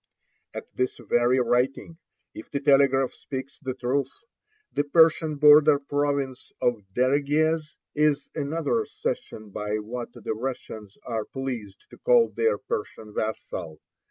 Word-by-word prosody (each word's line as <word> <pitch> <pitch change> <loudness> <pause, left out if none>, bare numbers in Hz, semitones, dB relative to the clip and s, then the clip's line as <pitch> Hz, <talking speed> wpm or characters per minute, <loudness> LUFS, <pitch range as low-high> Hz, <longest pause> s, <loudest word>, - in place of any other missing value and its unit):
At - - -5
this 125 0 -1
very 120 +2 +2
writing, 130 +7 0 0.3
if 325 +1 -10
the 140 - -2
telegraph 135 -2 +4
speaks 135 +2 -7
the 130 -4 -4
truth, 130 +1 -1 0.6
the 145 - +1
Persian 160 +1 +4
border 150 0 +7
province 140 -2 -2
of 120 -3 +1
Dereguez 150 +4 +1 0.2
is 150 -1 +2
another 160 - -1
cession 430 - -5
by 105 +1 -3
what 120 +3 -6
the - - -4
Russians 110 -4 -6
are 110 -3 -2
pleased 120 -7 -6
to - - -14
call - - +4
their 455 +1 +1
Persian 405 - -5
vassal. 90 -8 -4
140 Hz, 130 wpm, -26 LUFS, 120-155 Hz, 0.6 s, border